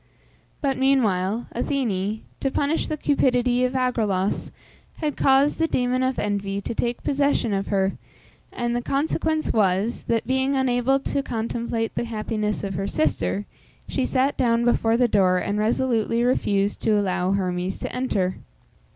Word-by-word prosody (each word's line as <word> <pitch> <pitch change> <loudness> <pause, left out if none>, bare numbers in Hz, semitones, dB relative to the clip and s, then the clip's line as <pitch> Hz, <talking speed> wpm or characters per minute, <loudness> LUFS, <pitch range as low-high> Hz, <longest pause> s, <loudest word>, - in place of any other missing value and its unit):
But 270 -2 0
meanwhile 230 -5 +2
Athene, 220 -6 -1 0.2
to 270 - 0
punish 290 +4 0
the 310 - -3
cupidity 250 -4 +2
of 250 - -2
Agraulos, 215 -7 0 0.5
had 300 -3 -2
caused 275 +3 +3
the 325 - +3
demon 250 -3 0
of 260 0 0
envy 200 -1 -1
to 200 - -4
take 240 +1 -2
possession 280 -6 +1
of 195 0 -1
her, 195 -1 0 0.5
and 240 0 -2
the 240 - 0
consequence 310 +4 0
was, 205 +2 +1
that, 230 -1 0
being 265 +2 +1
unable 260 0 +2
to 280 - -1
contemplate 230 -2 -3
the - - -2
happiness 215 -2 -2
of 195 -1 -3
her 195 +2 -2
sister, 100 - 0 0.4
she - - -1
sat 260 - +1
down 235 -1 +2
before 230 -1 +2
the 245 0 +4
door, 190 -4 +3
and 205 +3 -1
resolutely 230 0 +1
refused 205 -5 +1
to 215 -1 +2
allow 185 -1 0
Hermes 185 -1 -1
to - - -5
enter. 195 -8 -1
235 Hz, 150 wpm, -24 LUFS, 200-260 Hz, 0.5 s, the